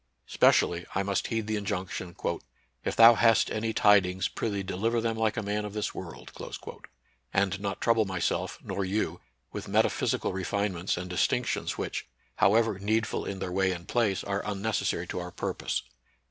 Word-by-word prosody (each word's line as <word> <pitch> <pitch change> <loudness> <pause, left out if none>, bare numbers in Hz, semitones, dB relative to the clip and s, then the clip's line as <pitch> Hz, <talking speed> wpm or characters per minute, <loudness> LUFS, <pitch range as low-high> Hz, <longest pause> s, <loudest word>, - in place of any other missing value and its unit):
Specially 85 0 +3
I 95 - +2
must 100 0 -1
heed 115 -2 -1
the 110 0 -1
injunction: 90 -3 -4 0.3
" - - -41
If - - -2
thou 115 +1 +9
hast 115 -1 +4
any 110 +1 -1
tidings, 95 -3 +4
prithee, 100 -3 -2
deliver 105 +5 0
them 115 0 0
like 110 0 0
a 115 - -1
man 105 +1 -1
of 105 -1 -6
this 105 0 -2
world," 90 -3 -8 1.0
and 100 0 +1
not 100 -1 -3
trouble 115 -2 +3
myself, 95 -2 -1
nor 100 - -2
you, 100 +3 -1 0.3
with - - -6
meta - - +3
physical - - -1
refinements 95 -1 -1
and 90 +1 -4
distinctions 110 +7 0
which, - - -4 0.3
however 110 0 +3
needful 110 +3 0
in 100 - -4
their 95 -1 -4
way 95 +1 +2
and 85 -1 -6
place, 110 -6 +1
are 100 0 -1
unnecessary 105 -4 -1
to 90 - -4
our 90 0 -5
purpose. - - -3
100 Hz, 170 wpm, -28 LUFS, 95-110 Hz, 1.0 s, thou